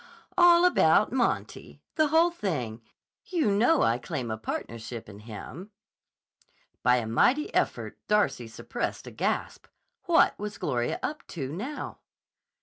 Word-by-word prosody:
"All 350 -1 +6
about 360 - +4
Monty. - - -2
The 310 -1 +3
whole 325 +3 +4
thing. 130 - -3 0.5
You 320 - +1
know, 245 +10 +3
I 115 +2 +2
claim 130 -4 -4
a 110 - -3
partnership 115 +1 -6
in 100 -1 -11
him." 120 - -9 1.1
By 125 0 +4
a 120 -2 -1
mighty 250 - +2
effort - - -1
Darcy 210 - +1
suppressed 115 - -5
a - - -8
gasp. - - -2 0.4
What - - +4
was 210 0 -5
Gloria 120 -4 -1
up 300 - -4
to, 135 -5 -5
now? 255 - -6
170 Hz, 135 wpm, -27 LUFS, -, 1.1 s, All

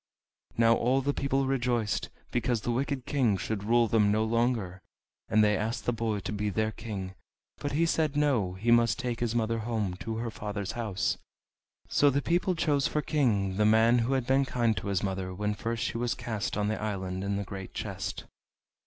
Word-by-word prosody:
Now 115 0 +5
all 125 +4 +2
the 145 +2 0
people 135 -1 0
rejoiced, 120 -5 0 0.2
because 120 -2 0
the 120 - -1
wicked 130 +1 -1
King 120 -8 +2
should 105 +1 -3
rule 120 +1 +4
them 105 -2 +3
no 110 +1 +2
longer. 110 -5 0 0.5
And 110 0 +4
they 105 0 +4
asked 110 +3 -2
the 120 - +1
boy 110 -3 -1
to - - -4
be 105 0 -1
their 110 +2 0
king, 100 -4 -6 0.5
but 145 - -3
he 165 +3 +3
said 155 -3 +1
no, 125 -11 +2
he 105 +6 0
must 120 0 +4
take 125 -2 -3
his 120 -1 -1
mother 115 0 0
home 110 -4 -2
to 110 +3 -4
her 115 0 -3
father's 100 -2 -4
house. 110 -5 -1 0.7
So 145 - +4
the 140 +1 +1
people 175 +4 +1
chose 145 -4 +2
for 150 - -1
king 105 -12 +1
the 105 - +3
man 115 +2 +5
who 120 +3 0
had 130 -2 0
been 135 +2 +3
kind 120 -4 +1
to - - -4
his 100 -2 0
mother 95 -1 -3
when 105 +2 -1
first 115 +2 -3
she 115 - -2
was 120 0 0
cast 110 -4 -3
on 105 0 +1
the 110 +1 -2
island 95 -3 -3
in 100 0 -1
the 100 - -2
great 95 -1 -8
chest. - - -4
115 Hz, 205 wpm, -29 LUFS, 105-125 Hz, 0.7 s, Now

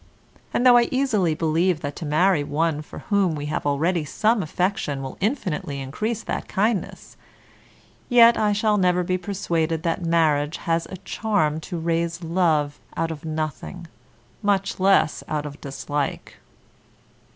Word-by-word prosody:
And 245 - 0
though 245 -1 +8
I 240 -1 +4
easily 215 - +1
believe 165 +1 +1
that 145 0 -4
to 160 - -5
marry 155 +1 +3
one 150 +1 0
for 150 - -11 0.2
whom 190 -5 +3
we 145 -1 -5
have 145 - -2
already 160 +4 +1
some 215 +9 +1
affection 165 -5 -1
will 135 - -6
infinitely 185 - -2
increase 205 - -3
that - - -4
kindness, 210 0 -2 0.9
yet 235 -1 +7
I 210 -1 +2
shall 210 +1 +2
never 180 -1 +2
be 185 +1 -1
persuaded 165 -4 -1
that 170 +1 -1
marriage 160 -3 +2
has 165 0 -1
a 190 - -8
charm 190 -11 0
to 175 - -3
raise 170 +1 -1
love 160 -4 +1 0.2
out 165 0 0
of 160 -1 -8
nothing, 155 +3 -4 0.6
much 200 -2 0
less 190 -4 +3
out 150 -1 -2
of 145 0 -8
dislike. 145 0 -4
170 Hz, 150 wpm, -23 LUFS, 155-195 Hz, 0.9 s, though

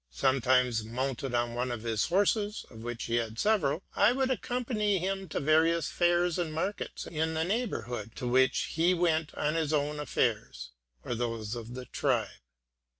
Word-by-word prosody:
Sometimes 125 - +2
mounted 130 +2 -3
on 120 0 0
one 125 +1 -1
of 115 -2 -5
his 115 -2 0
horses, 205 +3 +1
of 110 - -11
which 120 0 -5
he 115 - 0
had 115 -1 -2
several, 180 - +1
I 210 +4 +5
would 265 0 +1
accompany 235 -5 0
him 190 +1 -2
to - - -2
various 160 +3 +3
fairs 175 0 +2
and 170 -3 -1
markets 165 +6 -3
in 160 0 -2
the 160 - +1
neighborhood, 160 - -3
to 125 - -4
which 130 +2 +2
he 170 +3 +3
went 165 -3 +1
on 150 +1 0
his 160 -2 0
own 150 0 0
affairs, 65 - -1 0.3
or - - -2
those 115 -2 -3
of 115 -2 -6
his 125 +1 -7
tribe. - - +1
150 Hz, 170 wpm, -30 LUFS, 120-180 Hz, 0.3 s, I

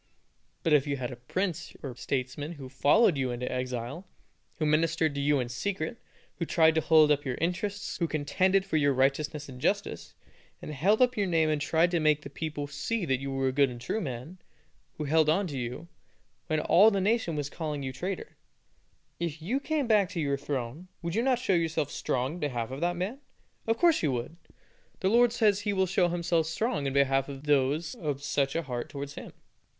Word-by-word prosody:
But 160 - +2
if 145 -1 +4
you 140 -1 -1
had 125 -1 -4
a - - -6
prince 170 - -3
or 130 -4 -5
statesman 135 +5 -3
who 135 -5 -9
followed 145 - +4
you 130 -1 0
into 125 +1 -3
exile, 125 +7 -4 0.5
who 155 - -1
ministered 160 0 +2
to 140 - -2
you 145 0 +3
in 125 - -1
secret, 165 - -3 0.4
who 170 - 0
tried 160 -1 +4
to 160 - +2
hold 155 -2 +5
up 145 0 +2
your 130 -3 -2
interests, 195 +4 -2
who 170 - 0
contended 185 +6 +1
for 175 -5 0
your 145 -2 +3
righteousness 145 +3 0
and 125 -2 -10
justice, - - -1 0.4
and 150 - -7
held 200 - +3
up 250 0 +2
your 205 -2 0
name 165 -3 +2
and 150 -1 0
tried 165 +3 +2
to 175 - +2
make 150 -1 +2
the 140 - -9
people 150 -1 -4
see 220 +7 -2
that 135 -4 +1
you 135 +1 -5
were 135 0 0
a - - -1
good 140 0 +3
and 120 -1 -8
true 170 - -2
man, 140 - -6 0.6
who 155 - -3
held 155 +1 +3
on 190 +6 +2
to 150 -6 -5
you, 125 +7 -5 0.6
when 155 -2 +1
all 195 +7 +6
the 200 -3 0
nation 200 -4 +1
was 145 -2 -2
calling 150 -2 -4
you 130 -1 -4
traitor 185 +8 -5 0.8
if 165 -2 -3
you 215 +12 -1
came 295 0 -1
back 210 -5 +3
to 185 -4 -4
your 140 -3 +1
throne, 140 +3 -4 0.2
would 170 0 -2
you 225 - +1
not 255 0 +2
show 245 -5 0
yourself 160 -4 0
strong 130 +3 -1
in 175 - -7
behalf 125 -6 -2
of 135 +3 -6
that 175 +1 0
man? 200 +10 -3 0.5
Of 225 0 +2
course 340 -2 +4
you 150 - +1
would. 125 +7 -4 0.6
The 190 - +2
Lord 240 +2 +5
says 215 -4 +3
He 205 0 -1
will 190 -1 +2
show 185 -1 +2
Himself 170 -2 0
strong 165 - -1
in 135 - -2
behalf 135 0 +2
of 135 0 -8
those 150 +2 +1
of 145 -4 -4
such 140 -1 0
a 165 - 0
heart 125 -4 -4
towards 140 0 -6
Him. - - -9
155 Hz, 215 wpm, -29 LUFS, 140-180 Hz, 0.8 s, all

